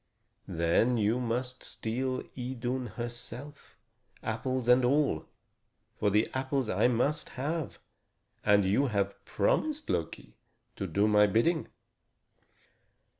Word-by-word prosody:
"Then 85 +9 +2
you 110 +3 +2
must 125 +1 -2
steal 130 +3 -3
Idun 125 0 -3
herself, 120 +4 -7 0.5
apples 125 +2 -2
and 125 +1 +6
all. 140 +3 +2 0.7
For 105 - +3
the 105 +2 +3
apples 130 -2 -1
I 100 +6 +3
must 135 +6 0
have, 155 +3 -2 0.7
and 100 -1 +4
you 110 +9 +3
have 100 -3 -1
promised, 300 - 0
Loki, 80 - -3 0.4
to 95 - -3
do 100 +5 +2
my 105 -1 +5
bidding." 130 - +2
120 Hz, 110 wpm, -30 LUFS, 105-130 Hz, 0.7 s, and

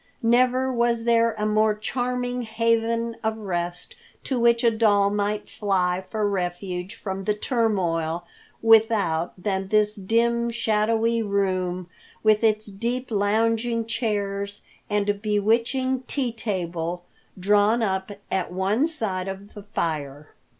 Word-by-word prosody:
Never 255 +2 +3
was 235 -1 +1
there 230 -1 +3
a 210 - -1
more 215 0 +2
charming 245 +2 -2
haven 230 0 0
of 220 0 -1
rest 175 -4 -4 0.3
to 260 -3 -1
which 235 0 +3
a 235 - +5
doll 205 -3 +3
might 205 0 -1
fly 185 -3 0
for 210 +2 -2
refuge 180 +1 -3
from 190 -1 -5
the 210 0 +1
turmoil 175 - 0 0.4
without 215 -7 +3
than 190 0 -2
this 210 +1 +2
dim, 235 +4 +1
shadowy 225 0 +1
room, 185 -3 -1 0.4
with 215 0 +4
its 215 -1 +2
deep 235 +5 -4
lounging 225 +3 +1
chairs 205 -3 -2 0.3
and 205 -1 0
bewitching 230 +5 +1
tea 260 -4 -1
table 175 -6 -3 0.4
drawn 205 +4 +3
up 190 -2 -1 0.2
at 190 -2 -1
one 195 - +1
side 195 - +1
of 195 +1 -7
the 205 - -9
fire. 150 -7 -4
210 Hz, 125 wpm, -24 LUFS, 190-230 Hz, 0.4 s, a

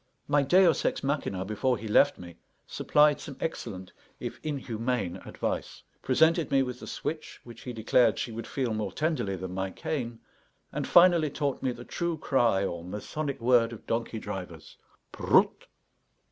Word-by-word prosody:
My 145 - +3
deus 175 +4 +4
ex - - 0
machinâ, 135 -10 -2
before 120 +5 0
he 110 - -7
left 145 +7 +4
me, 85 -2 -11 0.3
supplied 150 0 +3
some 140 -4 -8
excellent, 100 - -5 0.3
if - - -6
inhumane, 120 - -2
advice; - - -4 0.2
presented 160 +5 +3
me 135 -1 +3
with 125 -1 -5
the - - -9
switch, 155 0 -5
which 120 -1 -12
he 125 - -6
declared 115 0 +3
she 120 - -3
would 115 +1 -6
feel 130 -5 -1
more 105 -3 -2
tenderly 150 - -1
than 95 0 -6
my 95 0 -2
cane; 120 - -4 0.5
and - - -3
finally 175 -3 +6
taught 140 -1 -2
me 130 - 0
the 120 0 -9
true 170 -2 -2
cry 120 -9 +2
or 85 -3 -4
masonic 130 - -4
word 120 -1 +4
of 115 - -10
donkey 115 0 -2
drivers, 90 -7 -7 0.4
"Proot!" - - +2
120 Hz, 160 wpm, -28 LUFS, 105-145 Hz, 0.5 s, finally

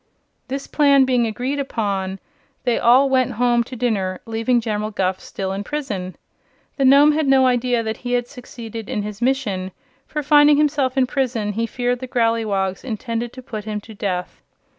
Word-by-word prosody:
This 275 +1 -4
plan 280 -3 +4
being 250 -3 +2
agreed 250 +6 -3
upon, 200 -8 -2 0.5
they 240 - +1
all 255 +4 +5
went 260 -2 +1
home 240 +1 +2
to 255 - -8
dinner, 200 -6 -1
leaving 225 +2 +1
General 215 -2 -2
Guph 190 -3 -1
still 190 -1 -5
in 195 +1 -3
prison. 205 -10 -4 0.6
The 275 - +2
Nome 280 +3 +7
had 305 -1 0
no 265 -1 +5
idea 245 -1 +1
that 220 0 -3
he 245 0 -4
had 245 -1 0
succeeded 230 -3 -9
in 220 -6 -2
his 210 +1 -7
mission, 235 -8 0 0.4
for 300 -1 -3
finding 295 0 +6
himself 285 -3 +1
in 260 - +4
prison 245 -6 -1
he 230 +2 -1
feared 245 +1 -1
the 255 - -6
Growleywogs 225 -6 0
intended 230 0 -4
to 255 - -10
put 215 -4 -6
him 210 -1 -3
to 220 +1 -12
death. 185 -4 -4
240 Hz, 180 wpm, -21 LUFS, 210-265 Hz, 0.6 s, Nome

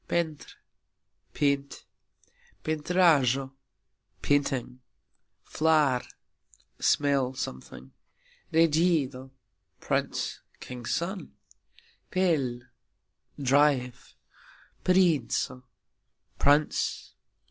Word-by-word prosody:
pentr: 160 -4 -2 0.8
paint. 140 -1 -1 0.8
pentrajxo: 150 -5 +2 0.7
painting. 135 -3 0 0.6
flar: 155 -5 +2 0.8
smell 140 -3 +1
(something). 65 - -7 0.6
regxido: 155 -5 +2 0.5
prince - - -2 0.2
(king's 125 -2 -8
son). 185 +3 -3 0.8
pel: 150 -10 0 0.8
drive. 140 -2 +1 0.7
princo: 160 -8 +2 0.8
prince. 145 +2 +1
145 Hz, 50 wpm, -28 LUFS, 130-160 Hz, 0.8 s, pentrajxo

